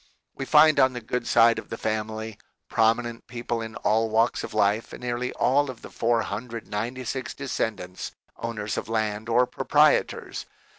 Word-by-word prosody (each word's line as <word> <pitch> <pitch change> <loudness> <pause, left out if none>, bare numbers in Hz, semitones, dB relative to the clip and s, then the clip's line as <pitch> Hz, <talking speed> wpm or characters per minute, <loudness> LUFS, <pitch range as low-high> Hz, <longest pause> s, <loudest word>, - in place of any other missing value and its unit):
We 135 - -5
find 155 0 +6
on 130 -1 +5
the 125 - -4
good 120 +1 -3
side 115 0 +5
of - - -11
the 115 - -5
family 110 0 -3 0.3
prominent 115 +1 +1
people 120 -1 -3
in 110 0 -6
all 110 +1 +1
walks 115 +2 +2
of - - -6
life 105 +1 +1
and - - -8
nearly 125 +1 -2
all 140 +2 +2
of 125 -3 -8
the - - -10
496 115 +2 -2
descendants 110 -9 -3 0.3
owners 110 -2 -4
of - - -4
land 110 0 -1
or 120 +2 +4
proprietors. - - +1
115 Hz, 155 wpm, -26 LUFS, 110-125 Hz, 0.3 s, find